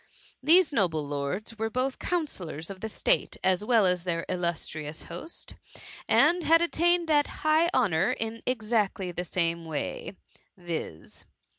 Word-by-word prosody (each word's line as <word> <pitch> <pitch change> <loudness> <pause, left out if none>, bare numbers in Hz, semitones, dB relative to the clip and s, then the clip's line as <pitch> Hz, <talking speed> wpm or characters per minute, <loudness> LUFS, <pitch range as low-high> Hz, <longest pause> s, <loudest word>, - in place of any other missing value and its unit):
These 320 +3 +5
noble 165 - +1
lords 145 +11 -4
were 225 0 -1
both 255 +3 -2
counsellors 190 - -3
of 190 -1 -10
state - - +1
as 190 +1 +2
well 225 -2 +4
as 180 -1 +1
their 165 -2 -2
illus 175 -2 -2
trious 155 0 -6
host, 175 - -8 0.6
and 350 0 +4
had 330 +1 +5
attained 345 0 +2
that 295 -2 +3 0.2
high 310 +2 +4
honour 190 - +2
in 225 0 -4
exactly 215 -6 0
the 175 +1 -4
same 170 -1 -1
way, 160 +3 -5 0.4
viz. 165 - -7
195 Hz, 140 wpm, -28 LUFS, 170-270 Hz, 0.6 s, These